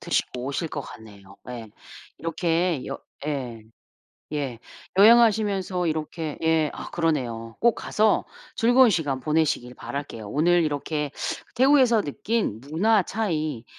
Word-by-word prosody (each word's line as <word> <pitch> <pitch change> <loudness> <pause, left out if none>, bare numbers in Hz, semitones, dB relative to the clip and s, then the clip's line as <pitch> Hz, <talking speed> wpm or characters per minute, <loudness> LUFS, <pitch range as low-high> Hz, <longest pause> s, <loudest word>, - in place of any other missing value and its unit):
드시고 125 -1 -2
오실 140 +5 -2
것 145 - -4
같네요. 100 -6 -13
예. 115 -3 -7 0.5
이렇게 165 -1 0
여 - - -5 0.3
예. 125 -7 -4 0.7
예. 135 -6 -3 0.4
여행하시면서 205 -5 +4
이렇게 155 0 -3
예 160 -2 +3
아 - - -7
그러네요. 120 -9 -2
꼭 235 -1 +4
가서 215 0 +1 0.3
즐거운 245 +2 +5
시간 145 -7 0
보내시길 150 -4 0
바랄게요. 140 -7 -6
오늘 170 +8 +3
이렇게 150 0 -2 0.4
태국에서 255 -4 +5
느낀 175 - -2
문화 190 - +2
차이, 155 - -2
155 Hz, 270 characters per minute, -25 LUFS, 130-195 Hz, 0.7 s, 즐거운